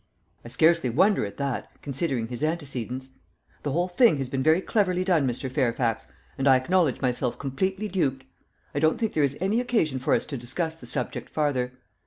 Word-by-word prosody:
"I - - -10
scarcely 160 +3 +3
wonder 180 - +3
at 100 - -11
that, 140 -3 -3
considering 135 -5 -2
his 125 +3 -4
antecedents. 135 -5 -3 0.5
The 145 - -2
whole 175 +5 +1
thing 185 - +4
has 135 -2 -3
been 130 0 -1
very 155 +5 +4
cleverly 185 -2 +1
done, 170 -7 +2
Mr. 125 +2 -2
Fairfax, 120 - 0 0.3
and 135 - +1
I 135 - +7
acknowledge 155 +2 +2
myself 125 -1 0
completely 190 +10 -2
duped. 135 -9 -1 0.5
I 145 - 0
don't 155 +1 +3
think 225 -2 -1
there 155 - +1
is 140 0 0
any 195 +6 +1
occasion 165 - 0
for 130 - +2
us - - -1
to 140 - -5
discuss 160 +7 -3
the 165 - -12
subject 125 -3 -4
farther. 130 -5 0
140 Hz, 190 wpm, -26 LUFS, 130-170 Hz, 0.5 s, I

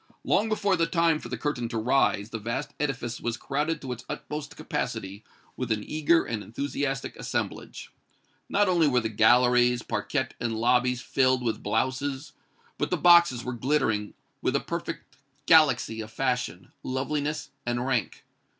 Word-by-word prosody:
Long 220 +2 +2
before 205 -3 +1
the 165 -2 +1
time 165 -2 +2
for 120 - -9
the 125 - -3
curtain 120 -2 -2
to 115 - -3
rise, 110 -3 +1
the 115 - -4
vast 115 +6 -4
edifice 125 -5 -3
was 120 0 -2
crowded 150 +5 -2
to 130 - -5
its 120 -1 -6
utmost 150 -1 -6
capacity 100 +2 -4 0.3
with 125 -2 -3
an 105 -1 0
eager 155 +5 +2
and 110 -2 -3
enthusiastic 135 +3 -3
assemblage. - - -4 0.6
Not 205 0 +3
only 170 -4 +3
were 125 -3 +3
the 110 - -2
galleries, 120 +2 +4
parquette - - -2
and 115 -2 -2
lobbies 125 +1 +2
filled 130 -1 +2
with 115 -2 -1
blouses, 130 +6 -2 0.5
but - - 0
the - - 0
boxes 170 -8 +6
were 125 - -4
glittering 120 -5 0 0.3
with - - 0
a - - +3
perfect - - -6 0.3
galaxy 135 -9 +4
of 110 - -8
fashion, 125 -7 -2
loveliness 145 +3 -2
and 120 +1 -1
rank. 125 -6 -2
125 Hz, 160 wpm, -27 LUFS, 115-150 Hz, 0.6 s, boxes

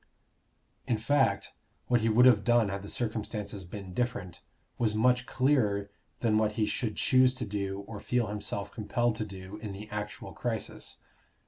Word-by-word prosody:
In 115 - +2
fact, 135 +5 +2 0.3
what 120 -2 +2
he 115 - +2
would 120 +3 +6
have 115 -5 +6
done 120 -3 +4
had 100 0 -3
the 100 - -8
circumstances 105 -3 -3
been 95 +1 -8
different, 100 -6 -2 0.4
was 110 -3 +2
much 125 +3 +3
clearer 105 -7 +2 0.3
than 110 -2 +3
what 110 -1 +1
he 110 0 +1
should 110 0 -2
choose 130 0 +4
to - - -3
do 100 -1 -3
or 105 +1 -8
feel 125 +2 0
himself 105 -1 -4
compelled 120 +2 0
to 110 - -1
do 95 0 -8
in 105 -2 -6
the 105 +2 -8
actual 105 0 -5
crisis. - - -4
110 Hz, 165 wpm, -30 LUFS, 100-120 Hz, 0.4 s, would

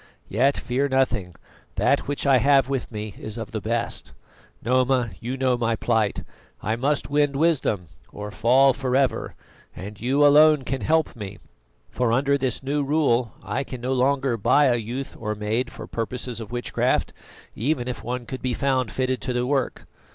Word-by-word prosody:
Yet 135 +7 +2
fear 135 +3 -1
nothing; 125 -10 0 0.4
that - - +2
which 145 +1 -2
I 135 -2 +5
have 135 -1 +4
with 135 -3 -3
me 105 -2 -5
is 110 +1 -5
of 115 -3 -6
the 110 - -3
best. 115 +1 -2 0.5
Noma, 125 -1 +2
you 125 +3 -4
know 130 -1 +2
my 115 -1 +1
plight: 110 -2 0 0.4
I 110 +2 -1
must 140 +3 -1
win 145 -1 +2
wisdom 140 - +1 0.3
or 105 0 -7
fall 130 +5 +4
for 130 -1 -2
ever, 135 -2 0 0.4
and 100 +2 -9
you 135 +5 +3
alone 150 0 +6
can 135 0 -3
help 160 +9 +1
me; 100 -3 -7 0.5
for 125 -2 0
under 140 +4 +2
this 130 -2 -1
new 145 +2 0
rule, 135 -6 +1
I 105 +6 -2
can 130 -2 -7
no 130 +2 -1
longer 130 -1 +1
buy 125 +7 +4
a 125 -3 +4
youth 120 +4 -5
or 105 -1 -3
maid 110 +4 -1
for - - -8
purposes 120 +1 -4
of 110 0 -8
witchcraft, 120 0 0 0.4
even 125 +1 -1
if 125 - -5
one 125 +1 -4
could 130 +2 -6
be 125 -2 -1
found 130 -5 0
fitted 130 +3 -1
to 130 - -2
the 125 0 0
work. 135 -1 -1
125 Hz, 180 wpm, -24 LUFS, 115-135 Hz, 0.5 s, alone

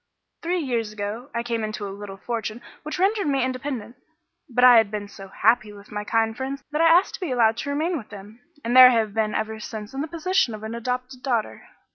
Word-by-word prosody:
"Three 350 +2 -1
years 240 -9 -2
ago 215 +5 -5
I 235 0 -2
came 230 -2 -2
into 215 -1 -4
a 195 - -6
little 200 -1 -8
fortune 225 +1 -4 0.2
which 305 - -5
rendered 395 0 +1
me 275 -2 +1
independent; 255 -3 -4 0.5
but 250 0 +1
I 250 -1 +9
had 220 -2 +4
been 205 -1 -5
so 195 -1 -11
happy 215 +2 +2
with 205 0 -14
my 210 0 -4
kind 225 +1 0
friends 265 +2 -5
that 300 +2 0
I 330 - +6
asked 350 +3 +4
to - - -6
be 360 - -2
allowed 230 -2 +3
to 285 - -4
remain 315 +4 -1
with 220 - -13
them, 205 +3 -11 0.3
and 240 +2 0
there 255 0 +11
I - - +2
have 220 -3 0
been 215 -1 0
ever 220 0 -2
since 215 0 -7
in 270 - -3
the 310 - -3
position 335 - 0
of 215 - -11
an 220 +1 -5
adopted 250 +2 -4
daughter. 240 -4 -2
235 Hz, 235 wpm, -24 LUFS, 215-270 Hz, 0.5 s, there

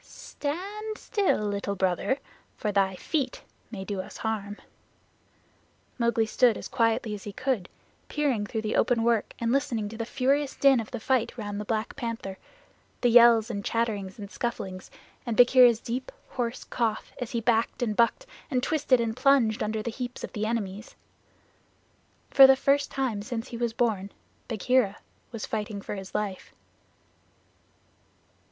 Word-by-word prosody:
"Stand 405 +9 -5
still, 395 - 0
Little 200 0 -2
Brother, 190 +7 0 0.4
for 210 - -1
thy 195 -1 +2
feet 270 - -2 0.3
may 195 -4 -6
do 195 -1 -3
us - - -10
harm." 210 -2 -3 1.4
Mowgli 235 -1 +2
stood 230 +1 +3
as - - -7
quietly 230 -3 +1
as 205 - -7
he 205 - -5
could, 245 -5 -2 0.4
peering 265 -9 0
through 220 0 -3
the 215 - -1
open 235 -2 +2
work 230 -2 +1
and 230 0 -1
listening 245 -6 0
to 225 - -9
the 230 0 -4
furious 275 +3 +1
din 275 -3 +5
of 225 - -5
the 245 - -5
fight 250 +1 0
round 205 -2 -4
the - - -6
Black 220 +1 -2
Panther 230 -5 -5 0.6
the 245 - +4
yells 235 -1 +7
and 200 -2 -4
chatterings 210 -5 -2
and 205 -2 -8
scufflings, 190 -6 -4 0.3
and 235 -3 -3
Bagheera's 245 -2 +7
deep, 250 - -4 0.2
hoarse 245 -2 -3
cough 230 -3 -2
as 245 -3 -4
he 235 - -1
backed 230 +1 +1
and 215 -3 -1
bucked 235 - +2 0.2
and 255 -4 0
twisted 275 -4 +2
and 225 -1 -1
plunged 255 -4 +3
under 215 0 -1
the 235 - -3
heaps 245 +1 -6
of - - -6
his 215 -1 -2
enemies. 215 -2 -3 1.4
For 270 -1 +10
the 265 - +7
first 280 +1 +2
time 255 -7 -2
since 230 +3 -5
he 235 - -6
was 235 -1 0
born, 220 -4 -1 0.4
Bagheera 230 -1 +1 0.3
was 230 -3 -5
fighting 210 -1 -3
for - - -6
his 195 -2 -8
life. 200 -3 -3
230 Hz, 160 wpm, -27 LUFS, 210-255 Hz, 1.4 s, For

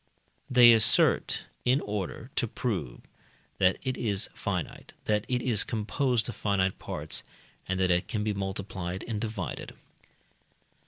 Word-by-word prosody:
they 120 -2 +8
assert, 110 -1 +4 0.2
in 130 +3 +3
order 105 +4 -4
to 120 - +1
prove 95 - -3 0.6
that 90 0 +4
it 130 -1 -1
is 100 -4 -1
finite, - - -4
that 105 0 +1
it 125 -1 -1
is 115 -5 +3
composed 120 +2 0
of 120 - -5
finite 95 -2 0
parts, - - -2 0.5
and 95 0 -1
that 95 -1 +3
it 90 0 +1
can 105 -1 -2
be 105 0 0
multiplied 95 -2 -4
and 110 -3 -3
divided. 110 -1 -4
105 Hz, 140 wpm, -28 LUFS, 95-120 Hz, 0.6 s, they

